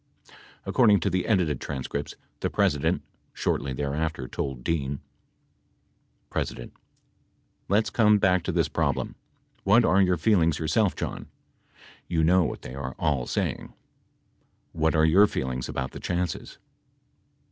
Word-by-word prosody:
61 - - -20 0.3
According 105 -5 +4
to 100 - +1
the 90 0 -1
edited 90 - +1
tran 70 -3 -4
scripts, 70 +2 -4 0.2
the - - -1
President, 75 -1 +1 0.3
shortly 70 - -1
thereafter, 75 +1 -2
told 65 -2 -4
Dean: 70 -3 -1 1.4
P. - - +2 1.3
Let's 105 +2 +2
come 105 -2 +5
back 95 -3 +3
to - - 0
this - - +1
problem. - - -1 0.5
What 110 +4 +5
are 95 +2 +4
your 90 -2 +3
feelings 85 -5 +3
yourself, 85 +6 +1
John? - - -5 0.8
You 80 -2 +1
know 90 +3 +5
what - - -4
they 60 - -8
are 65 -1 -5
all 70 -5 0
saying. - - -2 1.0
What 80 0 +1
are 80 0 +4
your 95 +6 +6
feelings 65 -7 -3
about 65 -1 -3
the - - -8
chances 90 -1 -3
80 Hz, 135 wpm, -26 LUFS, 70-95 Hz, 1.4 s, your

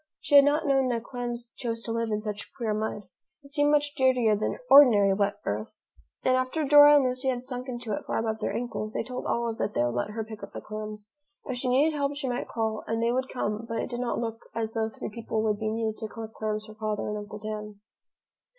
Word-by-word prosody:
She - - -4
had 280 -1 +9
not 295 +2 +2
known 270 -2 +3
that 235 -2 -1
clams 240 -1 -5
chose 230 -2 -3
to 230 - -4
live 230 0 -1
in 210 0 -1
such 210 -1 -5
queer 225 -3 -1
mud. 215 0 -3 0.4
It 280 - -12
seemed 290 0 +3
much 290 -1 +2
dirtier 255 -5 +3
than 210 - -2
ordinary 225 - +7
wet 200 +1 +1
earth, 105 +2 -2 0.6
and 255 - +3
after 255 +5 0
Dora 290 +1 +9
and 285 - +5
Lucy 255 +1 -1
had 250 -1 -2
sunk 250 0 -5
into 240 -3 -4
it - - -4
far - - -1
above 220 -1 -1
their - - -1
ankles, 230 -3 -4
they - - -1
told 250 +2 -5
Olive 235 -1 -1
that 210 - -2
they - - +3
would 120 - -1
let 120 +7 -1
her 220 +1 -4
pick 220 -1 -10
up - - -9
the - - -5
clams. 215 0 -7 0.3
If 255 -3 -3
she 250 +1 -1
needed 285 +5 +3
help, 285 0 -1
she 285 -2 -3
might 245 -1 -2
call, 220 -2 -2
and 225 0 -1
they 230 +1 +2
would 260 +1 -1
come, 215 -2 -3
but 230 - -2
it - - -3
did 240 - -3
not 245 -1 -1
look 225 -1 -3 0.2
as 225 -1 -2
though 225 -1 0
three - - -6
people 220 0 -3
would 210 -2 0
be 220 - -1
needed 220 0 -2
to 220 - -4
collect 220 0 -8
clams 215 0 -3
for 215 - -11
Father 215 -1 -3
and 210 - -2
Uncle 210 0 -8
Dan. 210 -1 -6
230 Hz, 250 wpm, -27 LUFS, 215-255 Hz, 0.6 s, had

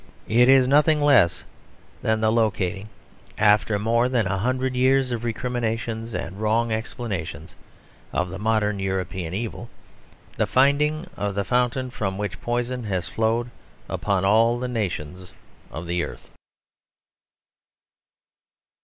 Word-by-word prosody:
It 120 +3 +4
is 135 -1 +6
nothing 150 +3 +4
less 140 - +4 0.6
than 110 0 0
the 110 0 +3
locating, 105 -3 0 0.5
after 105 0 +3
more 115 +4 +1
than 120 -4 +1
a 95 +1 -1
hundred 130 +4 0
years 130 0 +3
of 120 -1 -3
recriminations 115 -1 -3
and 95 +5 -5
wrong 115 +2 +1
explanations, 100 -9 -4 0.6
of 90 +2 -1
the 95 - -6
modern 105 -1 +1
European 95 -2 -3
evil: 115 +2 -5 0.7
the - - +1
finding 150 +5 +2
of 100 -1 -3
the 100 - 0
fountain 125 +4 0
from 95 -5 -3
which 100 -5 -4
poison 120 +1 -2
has 95 -4 -2
flowed 115 +2 0 0.4
upon 95 -2 -1
all 115 +4 +4
the 125 +1 -3
nations 90 -6 -4 0.4
of 80 +2 -7
the 85 +1 -1
earth. - - -9
110 Hz, 125 wpm, -24 LUFS, 95-125 Hz, 0.7 s, is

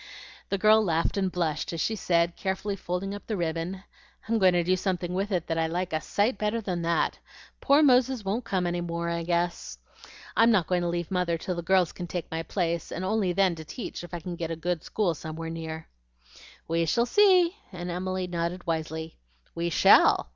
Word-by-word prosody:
The 200 - 0
girl 215 +2 +5
laughed 165 -4 0
and 190 -2 0
blushed 165 -4 -1
as 165 - -4
she 220 - 0
said, 170 -4 +1
carefully 195 +1 -2
folding 190 +1 -3
up 205 - -9
the 215 - -2
ribbon, 170 +3 -3 0.4
"I'm 225 0 +1
going 185 -2 +5
to 175 -1 +2
do 185 +2 +2
something 180 -2 -2
with 195 +3 -2
it 175 -3 0
that 165 0 -1
I 160 - +1
like 175 +1 -3
a 155 - 0
sight 205 +5 0
better 215 +2 0
than 185 -5 -3
that. 170 0 0 0.4
Poor 285 +2 +4
Moses 255 -4 +3
won't 215 +6 -1
come 190 -5 -1
any 175 0 -1
more, 170 0 -3
I 170 0 -2
guess. 170 +1 -2 0.6
I'm 230 +1 +5
not 200 -7 +3
going 180 +1 0
to 175 - -1
leave 170 0 -3
Mother 180 -2 0
till 180 +3 -3
the 170 - -4
girls 180 0 +2
can 175 - -7
take 175 0 -5
my 160 0 -2
place, 170 -1 -2
and 185 - -3
only 200 -2 +1
then 185 0 +3
to 160 -1 -8
teach, 195 - -7
if 175 - -10
I - - -4
can 175 +1 -6
get 165 -1 -4
a 165 - -2
good 165 0 -2
school 200 -6 0
somewhere 160 +1 -6
near." 160 -1 -6 0.8
"We 165 0 0
shall 235 +9 +2
see!" 370 - +5 0.2
and 175 -1 -5
Emily 185 +1 -2
nodded 175 +1 -3
wisely. 160 0 -3 0.3
"We 170 +1 -2
shall!" 155 - +5
175 Hz, 210 wpm, -27 LUFS, 170-195 Hz, 0.8 s, girl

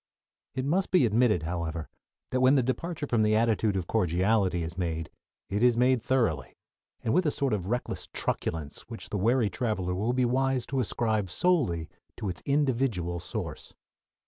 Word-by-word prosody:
It 130 0 -1
must 180 +7 +1
be 180 -9 +4
admitted, 110 -5 +3
however, 80 -1 -3 0.4
that 130 - +1
when 130 +2 +6
the 130 - +3
departure 150 +5 -2
from 120 -5 +1
the 110 0 +3
attitude 110 -2 +2
of 90 - -2
cordiality 95 -1 +1
is 85 +1 -5
made 80 -3 -3 0.4
it 105 +2 -2
is 120 -1 +5
done 125 +1 +3
thoroughly, 110 - 0 0.5
and 110 - +1
with 180 +1 +3
a - - +5
sort 140 -4 0
of 95 -4 -2
reckless 120 +4 -3
truculence 75 -3 -3
which 115 - -7
the 105 - -2
wary 115 +1 +2
traveler 105 -7 -1
will 105 +7 0
be 130 0 +2
wise 130 0 +1
to 135 - -2
ascribe 110 -4 0
solely 95 - +1 0.3
to 105 - -3
its 90 - -5
individual 125 - +1
source. 85 - -6
110 Hz, 170 wpm, -28 LUFS, 90-130 Hz, 0.5 s, when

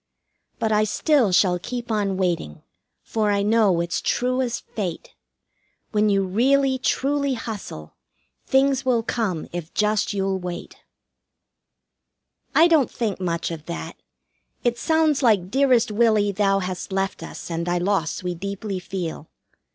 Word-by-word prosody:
But 220 - -1
I 215 0 +3
still 235 - +2
shall 180 -1 +3
keep 240 +4 -5
on 200 -3 0
waiting, 170 - -2 0.4
for 215 -2 0
I 200 -1 +2
know 210 -5 +3
it's 170 0 -2
true 255 +1 0
as 245 -2 -1
fate, 185 -6 -5 0.8
When 210 0 +2
you 195 -1 +2
really, 260 +7 +2
truly 280 +1 0
hustle, 200 - -7 0.5
things 270 0 +3
will 245 -3 +2
come 205 -9 -2
if 175 -2 -5
just 210 0 +1
you'll 195 -1 -1
wait." 180 -1 -6 1.8
I 325 +2 +7
don't 315 -6 +3
think 220 -6 -3
much 170 -2 -2
of 160 -2 -7
that. 170 - -5 0.7
It 240 -1 0
sounds 315 -3 +2
like 205 -7 +3
"Dearest 260 -4 +3
Willie, 215 -2 +3
thou 195 0 +2
hast 185 0 -4
left 195 +1 -1
us, - - -8
and 170 +1 -2
thy 175 0 +1
loss 180 -2 -1
we 180 0 -2
deeply 195 +2 -4
feel." 175 -4 -5
205 Hz, 145 wpm, -23 LUFS, 180-240 Hz, 1.8 s, I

